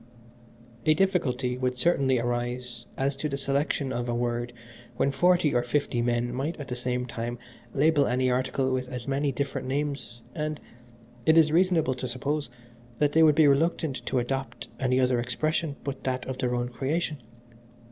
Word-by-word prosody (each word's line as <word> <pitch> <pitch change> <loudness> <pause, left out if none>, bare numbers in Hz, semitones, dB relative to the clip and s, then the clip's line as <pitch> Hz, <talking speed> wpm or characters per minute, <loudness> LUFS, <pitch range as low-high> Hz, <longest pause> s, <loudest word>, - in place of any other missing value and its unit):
"A 155 - +6
difficulty 135 -9 +1
would 125 -1 -1
certainly 135 -3 +2
arise 120 0 -3
as 135 +1 0
to 150 - -2
the 140 - -2
selection 140 0 0
of 120 0 -2
a 120 - 0
word 120 0 -1 0.5
when 140 - +2
forty 175 0 +3
or 120 - +3
fifty 120 -1 0
men 120 0 0
might 145 +6 -3
at 140 -1 -7
the 125 - -2
same 125 0 -2
time 120 0 -4 0.4
label 145 0 +4
any 130 +1 +1
article 130 +1 0
with 130 -1 -1
as 125 -1 -6
many 140 +1 +1
different 135 0 -3
names, 140 -4 -3
and, 155 -1 -3 0.7
it 160 +1 +6
is 155 -2 +6
reasonable 170 -5 +3
to 130 0 -5
suppose, 140 +4 -2 0.5
that 145 +2 +2
they 160 - +4
would 155 -2 +6
be 155 0 +6
reluctant 140 -2 +1
to - - 0
adopt 135 +2 -3
any 130 -1 +2
other 125 -1 +3
expression 155 +5 -1
but 140 -1 -5
that 130 -1 -2
of 130 0 -5
their 125 -2 0
own 120 0 -1
creation. 145 +4 -2
130 Hz, 175 wpm, -27 LUFS, 125-150 Hz, 0.7 s, A